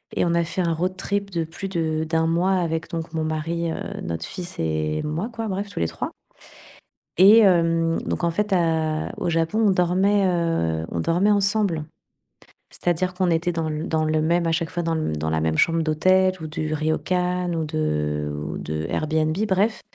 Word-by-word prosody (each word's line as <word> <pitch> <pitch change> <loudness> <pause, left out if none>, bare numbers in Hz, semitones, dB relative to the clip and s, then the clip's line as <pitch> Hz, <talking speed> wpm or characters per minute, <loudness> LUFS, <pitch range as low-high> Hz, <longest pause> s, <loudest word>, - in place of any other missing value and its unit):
et - - +2
on 170 - +1
a 170 0 +2
fait 185 +3 -3
un 170 -1 +1
road 180 +3 -2
trip 200 +1 -2
de 170 -3 -1
plus 170 +5 -6
de 160 -3 -1
d'1 160 0 0
mois 170 +4 +2
avec, 165 -3 -1
donc 165 0 -5
mon 160 -1 -1
mari, 165 +2 -2
heu, - - -3 0.3
notre 80 0 -4
fils 180 -1 -7
et 80 -1 -1
moi 165 +10 -3
quoi, 225 -1 -4
bref 200 +1 -3
tous - - -6
les 85 - +1
3 - - -4 1.1
et 200 +5 +8
hem, 165 -4 +3
donc - - -3
en 170 - +2
fait, 210 +4 -1
à 160 -3 +1
au - - -1
Japon, 165 +7 +1
on - - +5
dormait, 190 +3 +2
heu, 165 - 0
on 85 - -2
dormait 175 - +2
ensemble. 195 -5 +1 0.9
C'est-à-dire 180 +1 -1
qu'on 180 -1 +1
était 165 +2 +1
dans 165 -2 -2
l 155 0 -3
dans 160 -1 +1
le 155 0 +1
même, 170 +1 +2
à 165 - +1
chaque 165 +1 -1
fois, 175 - -2
dans 165 -1 0
l 155 - -1
dans 80 - -2
la 80 - 0
même 80 0 0
chambre 165 0 +3
d'hôtel 185 +4 +3
ou 160 - -5
du 155 0 -4
Ryokan 180 +3 0
ou 160 - -1
de 75 - -1
ou - - -5
de 75 +1 -4
Airbnb, 155 0 0
bref 205 +4 +1
165 Hz, 200 wpm, -23 LUFS, 155-185 Hz, 1.1 s, et